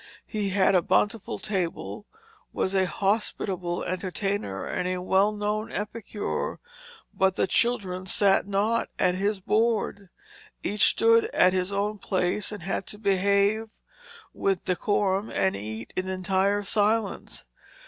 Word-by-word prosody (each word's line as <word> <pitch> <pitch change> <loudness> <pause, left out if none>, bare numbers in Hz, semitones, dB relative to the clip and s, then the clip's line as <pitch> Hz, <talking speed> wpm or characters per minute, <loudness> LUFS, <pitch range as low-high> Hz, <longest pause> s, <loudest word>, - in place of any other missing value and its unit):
He 210 -2 -2
had 195 0 +3
a 180 - +5
bountiful 205 +5 0
table, 200 +1 -3 0.4
was 190 - -1
a 190 -1 +2
hospitable 190 -3 -1
entertainer 185 - -3
and 180 0 -2
well 195 +3 +3
known 210 +1 -2
epicure; 210 0 -4 0.5
but 190 -1 +2
children 190 -6 0
sat 195 +1 +3
not 205 +3 0
at 180 - +3
his 195 +2 -1
board. 215 -2 0 0.5
Each 210 +1 +3
stood 230 0 +4
at 180 - +6
his 185 +1 0
own 205 +1 -1
place 185 +2 -1
and 205 -5 -7
had 195 +1 -3
to 210 - -8
behave 200 +2 +2 0.6
with 195 -2 -1
decorum 195 +2 0
and 190 - +1
eat 110 +2 -6
in 185 0 -2
entire 190 +2 +1
silence. 210 +1 0
195 Hz, 125 wpm, -26 LUFS, 185-210 Hz, 0.6 s, at